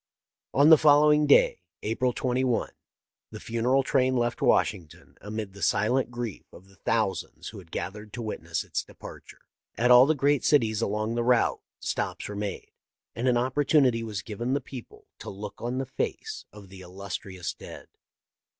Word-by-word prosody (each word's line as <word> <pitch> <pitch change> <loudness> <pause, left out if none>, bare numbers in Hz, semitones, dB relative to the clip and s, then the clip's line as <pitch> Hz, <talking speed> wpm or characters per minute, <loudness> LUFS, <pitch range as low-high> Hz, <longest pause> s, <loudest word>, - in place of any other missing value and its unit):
On 145 +3 +5
the 160 - +9
following 150 0 +5
day 140 - +4 0.2
(April 125 +4 0
2i) 125 0 0 0.6
the - - -9
funeral 125 +4 +1
train 130 -1 +2
left 120 0 -1
Washington 80 -4 0
amid 105 -2 -6
the 100 - -12
si 105 +4 +2
lent 130 +1 +1
grief 120 -4 -6
of 95 - -15
the 95 - -22
thousands 110 -3 -2
who 105 - -10
had 90 -4 -15
gathered 105 +5 -6
to 120 - -5
wit 110 - -5
ness 80 -1 -3
its - - -3
departure. - - -13 0.4
At 120 +2 +3
all 125 +2 +8
the 155 - +2
great 145 0 +2
cities 110 -8 +2
along 110 +2 -1
the 120 0 -1
route 125 0 +2 0.2
stops - - -3
were 105 - -6
made, 100 -1 -5 0.4
and 120 +3 -1
an 125 -1 +3
opportunity 130 -1 +2
was 105 -6 -5
given 120 +5 -3
the - - +1
people 130 -2 -11
to - - -8
look 100 +1 -8
on 120 +2 -3
the 135 - -2
face 430 - -4
of 105 -2 -13
the 95 0 -12
illustrious 95 0 -6
dead. - - -11
120 Hz, 175 wpm, -27 LUFS, 105-130 Hz, 0.6 s, the